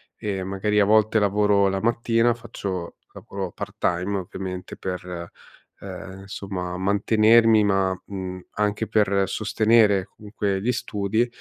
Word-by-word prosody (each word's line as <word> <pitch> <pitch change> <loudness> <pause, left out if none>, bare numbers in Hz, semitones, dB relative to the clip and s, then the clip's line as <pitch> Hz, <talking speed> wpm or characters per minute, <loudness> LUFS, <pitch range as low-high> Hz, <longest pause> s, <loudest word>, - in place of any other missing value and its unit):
E 95 -3 -3
magari 100 +2 0
a 100 - +5
volte 110 +1 +4
lavoro 100 -1 +3
la 95 0 -1
mattina, 115 0 +2
faccio 100 -7 -6 0.2
lavoro 95 -2 -6
part-time, 90 +3 -2
ovviamente, 95 0 -7
per, 90 -2 -6 0.5
ehm, 95 +1 -9
insomma, 95 -2 -5
mantenermi 110 +3 +4
ma, 95 -2 +1
mhmm, 95 -2 -6
anche 105 +1 -1
per 100 -2 +2
sostenere 105 -1 +3
comunque 100 -2 -3
gli 125 +4 +1
studi, 110 0 -1
100 Hz, 120 wpm, -24 LUFS, 95-110 Hz, 0.5 s, a